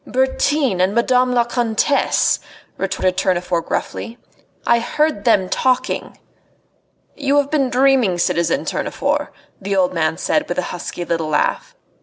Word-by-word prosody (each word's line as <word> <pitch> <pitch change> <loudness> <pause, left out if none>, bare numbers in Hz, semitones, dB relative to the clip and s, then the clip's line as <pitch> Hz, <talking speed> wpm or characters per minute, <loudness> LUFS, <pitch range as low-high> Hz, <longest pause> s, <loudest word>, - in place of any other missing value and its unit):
"Bertin 265 -4 +1
and 190 +3 +1
Madame 250 +1 +2
la 245 -1 +3
Comtesse," 240 +3 +1 0.4
retorted 190 -1 -1
Tournefort 180 -2 0
gruffly. 235 +1 -4 0.5
"I 235 - +4
heard 300 -2 -1
them 195 -5 +3
talking." 255 +5 -1 1.0
"You 285 0 +1
have 285 0 +1
been 275 -4 +1
dreaming, 255 -7 +3
citizen 170 +10 0
Tournefort," - - -2 0.3
the 195 +1 -2
old 185 -1 +2
man 160 -1 0
said, 300 0 0
with - - -3
a 180 - 0
husky 175 0 -5
little 165 -2 -2
laugh. 150 - -1
235 Hz, 135 wpm, -19 LUFS, 185-265 Hz, 1.0 s, I